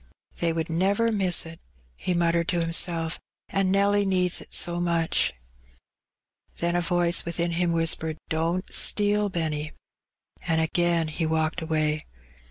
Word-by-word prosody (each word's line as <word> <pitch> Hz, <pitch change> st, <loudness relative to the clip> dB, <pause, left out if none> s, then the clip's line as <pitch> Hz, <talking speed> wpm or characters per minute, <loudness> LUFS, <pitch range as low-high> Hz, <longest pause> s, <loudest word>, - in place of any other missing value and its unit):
" -, -, -33 dB
They 170 Hz, -1 st, +2 dB
would 165 Hz, -1 st, -2 dB
never 200 Hz, +7 st, +1 dB
miss 190 Hz, -6 st, +2 dB
it," 165 Hz, 0 st, -10 dB, 0.4 s
he 180 Hz, -, -2 dB
muttered 170 Hz, -1 st, +1 dB
to 175 Hz, -, +1 dB
himself, 165 Hz, 0 st, 0 dB, 0.3 s
"an' 195 Hz, -1 st, +1 dB
Nelly 200 Hz, +1 st, +3 dB
needs 185 Hz, -2 st, +1 dB
it -, -, -13 dB
so 175 Hz, 0 st, 0 dB
much.'' 170 Hz, -2 st, +2 dB, 1.3 s
Then 170 Hz, 0 st, 0 dB
a 175 Hz, -, +2 dB
voice 175 Hz, 0 st, +2 dB
within 170 Hz, 0 st, -1 dB
him 170 Hz, +1 st, +1 dB
whispered, 160 Hz, -1 st, 0 dB
"Don't 165 Hz, +4 st, -1 dB
steal, 205 Hz, 0 st, +2 dB
Benny," 155 Hz, -4 st, -2 dB, 0.7 s
and 165 Hz, -1 st, +2 dB
again 170 Hz, 0 st, +1 dB
he 160 Hz, +1 st, -2 dB
walked 160 Hz, +2 st, 0 dB
away. 155 Hz, -1 st, -1 dB
170 Hz, 145 wpm, -26 LUFS, 160-180 Hz, 1.3 s, Nelly